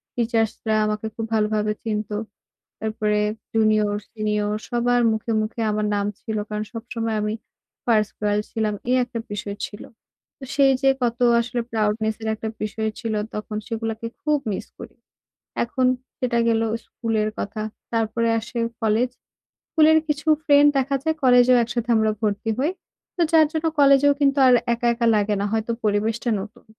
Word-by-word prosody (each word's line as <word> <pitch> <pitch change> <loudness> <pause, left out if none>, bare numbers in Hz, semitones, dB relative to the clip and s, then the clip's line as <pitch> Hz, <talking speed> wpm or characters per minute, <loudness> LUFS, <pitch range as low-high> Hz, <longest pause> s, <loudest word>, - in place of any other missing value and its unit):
টিচার্সরা 225 -2 0
আমাকে 215 +1 -2
খুব 225 - -3
ভালোভাবে 215 -1 +1
চিনতো। 210 -1 -2 0.7
তারপরে 215 -1 0 0.4
জুনিয়র, 215 -2 +3 0.2
সিনিয়র 210 -1 -1 0.2
সবার 245 0 +2
মুখে, 220 +1 -3
মুখে 215 +2 -4
আমার 210 0 0
নাম 200 0 0
ছিল 220 -1 -4
কারণ 210 0 -3
সবসময় 230 -1 -3
আমি 210 +1 -1 0.5
ফার্স্ট 215 -3 +2
গার্ল 210 0 +2
ছিলাম। 215 -2 -1 0.2
এই 255 - +4
একটা 240 -1 -6
বিষয় 205 0 -4
ছিল। 205 - -11 0.6
তো 270 - -9
সেই 275 -1 +5
যে 270 - +5
কত 235 -1 0 0.2
আসলে 240 +1 -2
proudness 220 0 0
এর 220 - -2
একটা 220 +1 -5
বিষয় 220 +1 -2
ছিল 225 -2 -2 0.2
তখন, 210 0 -5
সেগুলোকে 225 -1 -4 0.2
খুব 300 -1 +2
মিস - - -4
করি। - - -10 0.7
এখন 255 +2 0 0.3
সেটা 240 -2 +1
গেল 225 -1 +2 0.2
স্কুলের 220 -2 -1
কথা। 205 +2 -4 0.3
তারপরে 230 +1 0
আসে 235 +2 -6 0.2
কলেজ। 225 +3 +2 0.6
স্কুলের 315 0 +5
কিছু 300 +1 -2 0.2
ফ্রেন্ড 290 0 +6
দেখা 275 +1 +1
যায় 315 0 +1
কলেজেও 250 0 +6
একসাথে 235 +1 -3
আমরা 220 0 +3
ভর্তি 210 +1 -1
হই। 295 +7 +1 0.4
তো 350 - -2
যার 320 -1 +6
জন্য 320 0 -2
কলেজেও 280 0 +6
কিন্তু 280 -1 +3
আর 250 - +6 0.2
একা, 235 +1 -1
একা 235 0 0
লাগে 210 0 +1
না। 205 - 0
হয়তো 225 +1 -1
পরিবেশটা 215 +3 0
নতুন, 210 +2 -11
225 Hz, 155 wpm, -23 LUFS, 215-245 Hz, 0.7 s, ফ্রেন্ড